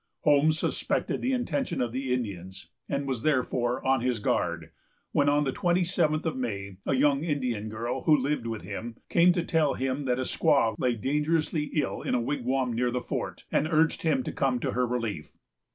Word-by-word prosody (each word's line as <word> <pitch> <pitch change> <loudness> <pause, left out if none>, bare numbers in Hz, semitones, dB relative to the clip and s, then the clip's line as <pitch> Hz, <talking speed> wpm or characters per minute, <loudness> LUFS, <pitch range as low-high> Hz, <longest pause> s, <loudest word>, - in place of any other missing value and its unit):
Holmes 150 +1 +4
suspected - - -1
the 260 - 0
intention 255 +1 -1
of 120 -2 0
the 130 +1 -3
Indians, 95 -7 -4 0.2
and 140 0 -1
was 130 -4 -2
therefore 125 -4 0
on 130 -1 +3
his 125 -1 0
guard, 105 - -1 0.4
when, 145 0 +3
on 145 +1 +3
the 135 - 0
twenty 175 +5 +1
seventh 165 -3 +1
of 160 - -1
May, 100 -6 -4
a 135 - +2
young 140 +2 +3
Indian 125 -9 -2
girl, 120 +4 -3
who 155 -2 +6
lived 135 -3 -1
with 115 -2 -4
him, 115 0 -6
came 175 +1 +5
to 175 -2 0
tell 160 -4 +1
him 135 +2 -2
that 125 -1 +1
a 130 - -1
squaw 140 -5 +2
lay 125 -2 +1
dangerously 150 +5 0
ill 150 - 0
in - - -1
a - - +2
wigwam 125 0 -1
near 125 +2 +1
the 125 +1 -1
fort, - - -4
and 155 - +2
urged 160 0 +2
him 145 -6 +1
to - - -4
come 130 -2 0
to - - -1
her 125 0 +1
relief. 115 -10 -4
130 Hz, 200 wpm, -28 LUFS, 120-150 Hz, 0.4 s, who